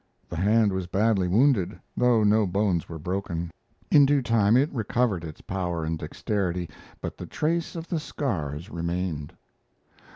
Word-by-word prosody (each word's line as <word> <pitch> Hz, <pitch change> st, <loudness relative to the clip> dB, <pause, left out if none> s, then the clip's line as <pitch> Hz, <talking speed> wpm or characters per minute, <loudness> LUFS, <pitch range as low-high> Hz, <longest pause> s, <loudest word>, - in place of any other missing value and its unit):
The -, -, -5 dB
hand 105 Hz, +3 st, +3 dB
was 95 Hz, -1 st, -2 dB
badly 100 Hz, 0 st, +2 dB
wounded, 105 Hz, -2 st, +2 dB, 0.2 s
though 120 Hz, -3 st, +3 dB
no 105 Hz, 0 st, +4 dB
bones 95 Hz, -2 st, 0 dB
were 80 Hz, -, -6 dB
broken. 85 Hz, 0 st, -3 dB, 0.4 s
In 145 Hz, -, +8 dB
due 140 Hz, -1 st, +3 dB
time 115 Hz, -1 st, +4 dB
it 145 Hz, +4 st, +2 dB
recovered, 110 Hz, -5 st, 0 dB
its 80 Hz, -2 st, -8 dB
power 90 Hz, -4 st, -3 dB
and 80 Hz, 0 st, -2 dB
dexterity, 90 Hz, +1 st, -2 dB, 0.3 s
but -, -, -6 dB
the -, -, -6 dB
trace 165 Hz, +2 st, -1 dB
of 165 Hz, 0 st, -6 dB
the 170 Hz, -, -1 dB
scars 85 Hz, -, -3 dB
remained. 85 Hz, -3 st, -3 dB
100 Hz, 155 wpm, -26 LUFS, 85-115 Hz, 0.4 s, In